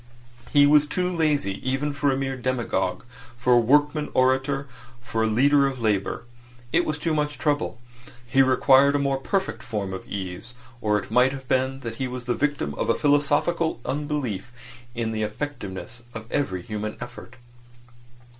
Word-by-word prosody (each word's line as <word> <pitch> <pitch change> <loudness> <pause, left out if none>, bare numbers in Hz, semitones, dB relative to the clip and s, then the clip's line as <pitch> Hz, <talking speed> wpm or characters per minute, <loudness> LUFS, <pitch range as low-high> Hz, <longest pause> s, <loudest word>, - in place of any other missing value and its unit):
He 145 -1 +6
was 150 0 +5
too 180 +4 -1
lazy 145 -11 +1
even 135 +3 -1
for 140 0 +1
a 130 - 0
mere 135 -1 -2
demagogue, 120 -7 -1 0.3
for 125 0 +3
a 120 - +7
workman 150 +5 +3
orator, 135 +2 +2 0.3
for 120 -2 -3
a 110 - +3
leader 140 +5 +4
of 135 -2 -4
labour. 105 -3 0 0.5
It 175 +1 +3
was 155 -1 -2
too 160 +1 -1
much 150 -1 -1
trouble. 145 -6 -1 0.5
He 130 +3 +3
required 135 +1 +5
a 140 -1 +1
more 135 -1 +1
perfect 190 +8 -2
form 105 -5 -4
of 95 - -7
ease; 100 +5 -6 0.3
or 105 -2 +2
it 105 - -6
might 125 +3 +4
have 135 -1 -8
been 130 +1 0
that 115 -2 -6
he 130 - -2
was 125 -1 -6
the 120 - +1
victim 145 - -1
of - - -1
a - - +4
philosophical 145 +3 +2
unbelief 140 -8 -3 0.4
in 115 -1 -1
the 110 -1 -2
effectiveness 115 -2 -5
of 110 0 -6
every 95 -11 -1
human 105 +1 -4
effort. 120 0 -9
130 Hz, 170 wpm, -25 LUFS, 115-145 Hz, 0.5 s, a